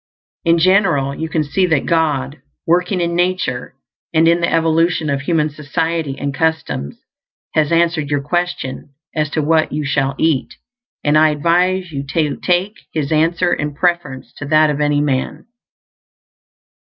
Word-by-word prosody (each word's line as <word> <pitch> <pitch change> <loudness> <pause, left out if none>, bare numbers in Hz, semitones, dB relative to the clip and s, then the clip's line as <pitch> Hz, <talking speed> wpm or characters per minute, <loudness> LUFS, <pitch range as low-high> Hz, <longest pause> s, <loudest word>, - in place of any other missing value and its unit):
In 170 0 +4
general, 170 -6 +3
you 160 +3 -5
can 155 -1 0
see 180 +6 0
that 155 -5 +1
God, 150 -4 0 0.2
working 180 +2 +1
in 170 0 -1
nature 175 -9 -1 0.4
and 160 0 +3
in 170 +1 +3
the 170 - +1
evolution 165 -1 +1
of 140 -1 -1
human 155 0 0
society 150 0 -2
and 140 -1 -3
customs, 160 - -2 0.6
has 155 -1 +1
answered 165 -3 +1
your 145 -1 0
question 150 -4 -3 0.2
as 155 -1 -1
to 155 +1 -1
what 160 +1 +2
you 150 0 -2
shall 135 -1 0
eat; 160 -5 0 0.5
and 150 +1 +4
I 155 0 +5
advise 175 +4 +1
you 140 -2 -4
to 150 -4 +1
take 185 +4 0
His 150 -2 -2
answer 170 +3 +2
in 150 -1 -3
preference 170 -6 -1
to 145 - -6
that 155 0 +4
of 145 0 -3
any 145 0 +2
man. 135 -3 -2
155 Hz, 155 wpm, -18 LUFS, 145-170 Hz, 0.6 s, I